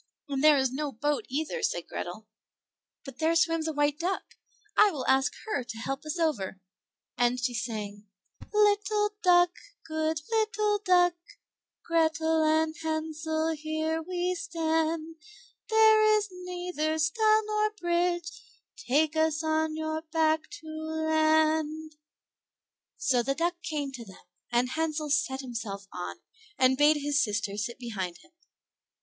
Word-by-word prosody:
"And 275 -1 -2
there 305 -1 +7
is 265 -2 +1
no 290 +1 -2
boat 290 +4 -1
either," 315 - -2
said 470 +3 -1
Grethel; - - -6 0.8
"but 270 -1 -10
there 325 +1 +2
swims 330 -1 +2
a - - 0
white 290 0 0
duck, 365 +3 -1 0.5
I 425 - +6
will 290 -9 -4
ask 265 +1 +3
her 425 - -1
to 230 - -8
help 270 +5 -4
us 305 - -3
over;" 230 - -1 0.6
and 245 +1 +2
she 250 0 -1
sang, 210 -2 -5 0.4
"Little 415 0 +2
duck, 350 -1 +5 0.3
good 315 0 -1
little 430 -2 +1
duck, 355 -3 +3 0.7
Grethel 320 -1 +2
and 315 0 +2
Hansel, 315 0 -2
here 315 +1 -2
we 360 +1 -2
stand, 325 -1 -1 0.5
There 435 -1 +6
is 420 0 -2
neither 360 -3 -3
stile 430 +8 +3
nor 425 0 +1
bridge, 345 0 -1 0.3
Take 310 0 +1
us 315 0 +1
on 315 0 0
your 315 0 -3
back 315 -1 0
to 320 - -13
land." 315 0 +1 1.0
So 250 -2 +2
the 275 +3 -1
duck 345 +2 -1
came 295 -4 -3
to 250 -3 -8
them, 190 -3 -15 0.3
and 245 +1 +2
Hansel 310 -2 -2
sat 295 -2 +1
himself 220 -6 -6
on, 180 - -6 0.4
and 260 0 +4
bade 295 +2 +5
his 290 0 +1
sister 210 -2 -2
sit 215 +3 -3
behind 195 -8 -5
him. - - -22
315 Hz, 140 wpm, -28 LUFS, 280-345 Hz, 1.0 s, there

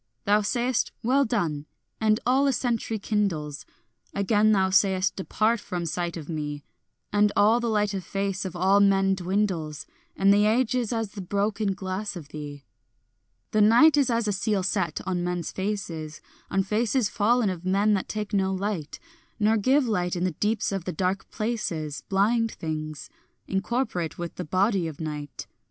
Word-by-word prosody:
Thou 210 +1 +4
sayest 240 +3 0
"Well 270 +4 +3
done," 160 -10 -1 0.3
and 215 0 +3
all 265 +3 +3
a 275 - +2
century 230 -2 -1
kindles; 185 -9 -2 0.5
Again 205 +2 +3
thou 190 -2 +3
sayest 190 -1 +3
"Depart 215 +4 0
from 175 -3 -4
sight 170 +1 -2
of 155 -3 -8
me," 150 -3 -4 0.5
And 205 0 +4
all 215 +4 +5
the 235 -1 -1
light 210 -2 +1
of 190 -2 -3
face 195 +1 -2
of 185 -2 -5
all 190 +3 +4
men 195 -1 +4
dwindles, 180 -5 -1 0.3
And 195 +1 +4
the 205 +1 +4
age 235 +2 +2
is 245 -3 0
as 225 -3 -2
the 205 - -7
broken 200 +1 -1
glass 190 +2 -4
of 155 -5 -9
thee. 145 -2 -8 0.9
The 215 - +3
night 235 +9 +6
is 280 -3 +3
as 230 -2 +1
a - - +2
seal 195 0 0
set 185 -4 -1
on 180 -2 -1
men's 175 -1 -2
faces, 175 -6 -4 0.3
On 195 0 +1
faces 220 +4 +1
fallen 210 +1 +2
of 175 -2 -7
men 200 +3 +2
that 195 - -1
take 215 0 -4
no 190 -1 +2
light, 190 -5 -3 0.4
Nor 215 +1 +3
give 260 +5 +3
light 180 -5 0
in 175 - -2
the 185 - +1
deeps 210 +8 -1
of 195 -3 -3
the 185 - -2
dark 185 +4 -2
places, 175 -10 -3
Blind 225 +4 +2
things, 155 -1 -5 0.4
incorporate 195 - -2
with 175 -1 -5
the - - -6
body 185 +2 +1
of 155 -3 -8
night. 150 -2 -5
200 Hz, 175 wpm, -26 LUFS, 175-215 Hz, 0.9 s, night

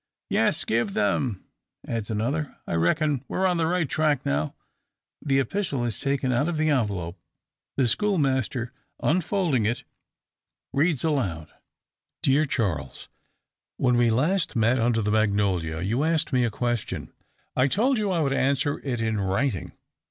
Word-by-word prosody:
"Yes, - - +2
give 115 -3 0
them!" 105 0 0 0.4
adds 115 -2 -3
another. 135 +8 -2
"I - - -4
reckon 135 - +1
we're 190 - 0
on 180 -2 +2
the 165 -1 +1
right 175 -2 +1
track 150 -2 +1
now." 75 +2 -1 0.7
The 135 -2 +2
epistle 135 - -1
is 115 -3 -2
taken 135 -2 0
out 140 +7 +1
of 170 - -2
the 155 0 +2
envelope. 100 - -1 0.6
The 130 -3 +3
schoolmaster, 130 - 0 0.3
unfolding 170 - +1
it, 120 - -2 0.9
reads 145 0 +2
aloud: 100 - -1 0.7
"Dear 145 +3 +3
Charles, 90 - -2 0.7
"When 125 -2 +2
we 120 -1 +4
last 155 +11 +1
met 120 +3 +3
under 115 -1 +2
the 105 - 0
magnolia, 100 -7 +1
you 115 +9 0
asked 160 -2 +1
me 125 -1 +3
a - - +1
question. 120 +1 -3 0.4
I 130 +1 +4
told 240 - +2
you 210 -2 0
I 175 -3 +1
would 140 -2 +1
answer 140 +2 +1
it 125 -4 -2
in 110 -2 0
writing. 100 +2 -1
130 Hz, 150 wpm, -25 LUFS, 110-150 Hz, 0.9 s, we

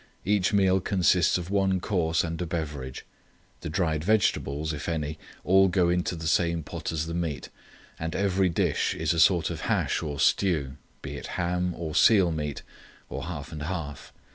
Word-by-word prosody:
Each 100 -1 +2
meal 95 -2 +3
consists 90 -2 +2
of 90 +1 -6
one 95 -2 +2
course 85 -4 0
and 85 0 -4
a 90 - -2
beverage. 75 -6 -5 0.5
The - - -6
dried 80 -2 0
vegetables, 80 -7 +1
if 75 +2 -5
any, 75 -2 -3 0.2
all 95 +1 +5
go 90 -1 +2
into 90 0 0
the 80 -1 -7
same 85 0 +1
pot - - -5
as 80 -1 -2
the 85 - -5
meat, 85 -4 -3 0.5
and 80 0 -3
every 95 -1 +2
dish 85 - 0
is - - 0
a 85 - -1
sort 85 0 +4
of - - -5
hash - - +1
or 75 -1 -4
stew, 75 -8 +1 0.3
be - - -6
it - - -7
ham 90 0 -1
or 80 -2 -5
seal 90 +1 +5
meat 75 -3 -4 0.5
or - - -5
half 80 -4 -6
and 80 -2 -7
half. 75 -3 -5
85 Hz, 180 wpm, -27 LUFS, 80-95 Hz, 0.5 s, all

